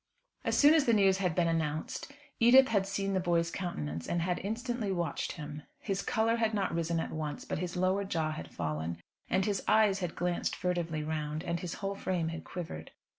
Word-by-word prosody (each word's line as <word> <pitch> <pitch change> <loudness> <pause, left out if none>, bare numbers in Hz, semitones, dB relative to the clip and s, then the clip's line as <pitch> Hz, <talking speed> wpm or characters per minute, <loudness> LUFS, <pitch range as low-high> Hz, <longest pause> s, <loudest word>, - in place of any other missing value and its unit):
As - - +1
soon 295 +1 +7
as 310 -3 +4
the 235 - +4
news 195 -2 +4
had 180 -4 0
been 175 -2 +3
announced, 160 - -2 0.3
Edith 260 +3 +7
had 200 -3 +2
seen 195 0 -1
the 190 - +2
boy's 170 -2 +1
countenance 80 - -4
and 170 -1 0
had 180 0 0
instantly 225 +1 -2
watched 170 -5 -2
him. 150 -2 -7 0.2
His 195 -2 -2
colour 225 0 +1
had 225 -1 +1
not 195 -4 0
risen 165 0 0
at - - -3
once; 150 -2 -4
but - - -3
his 180 0 -3
lower 185 +2 +2
jaw 160 -5 -1
had 80 - -6
fallen, 80 0 -3 0.3
and 190 +1 +2
his 205 -3 0
eyes 210 -3 +4
had 180 -3 -3
glanced 175 0 -1
furtively 170 -4 -1
round, 155 0 -3
and 170 -1 -2
his 180 -1 -4
whole 195 0 -3
frame 180 -4 -1
had 165 0 -6
quivered. 160 - -6
180 Hz, 205 wpm, -31 LUFS, 160-200 Hz, 0.3 s, soon